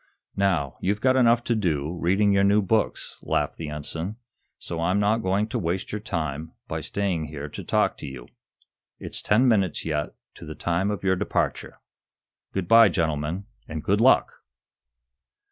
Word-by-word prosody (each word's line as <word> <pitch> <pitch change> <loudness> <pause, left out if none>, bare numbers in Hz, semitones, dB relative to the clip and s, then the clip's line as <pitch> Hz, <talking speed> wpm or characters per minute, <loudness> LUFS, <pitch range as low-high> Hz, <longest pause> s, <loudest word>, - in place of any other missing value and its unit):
"Now, 90 -9 0
you've 100 +2 0
got 130 +3 +3
enough 120 -2 +4
to 120 - 0
do, 85 -7 -1
reading 95 +4 +2
your 100 0 +3
new 100 +1 +4
books," 110 +3 -1
laughed - - -1
the 80 -2 -5
ensign, 80 +6 -5 0.4
"So 85 -1 -5
I'm 90 +4 +2
not 105 +3 +2
going 100 +2 +1
to 120 - -2
waste 90 0 -2
your 105 - -4
time 80 -4 -4
by - - -3
staying 95 -6 -1
here 75 -1 -6
to - - -8
talk - - +1
to - - -7
you. 65 -3 -9 0.7
It's - - -6
ten 115 +5 +3
minutes, 100 -8 +1
yet, 75 -2 -2 0.2
to - - -10
the 75 - -7
time 85 +3 0
of 105 -1 -3
your 95 -1 +3
departure. - - -2 0.7
Good 95 -3 -3
bye, 115 0 +8
gentlemen 80 +1 -1 0.2
_and 80 -1 -5
good 100 +3 +2
luck! 130 - +3
95 Hz, 170 wpm, -25 LUFS, 80-105 Hz, 0.7 s, bye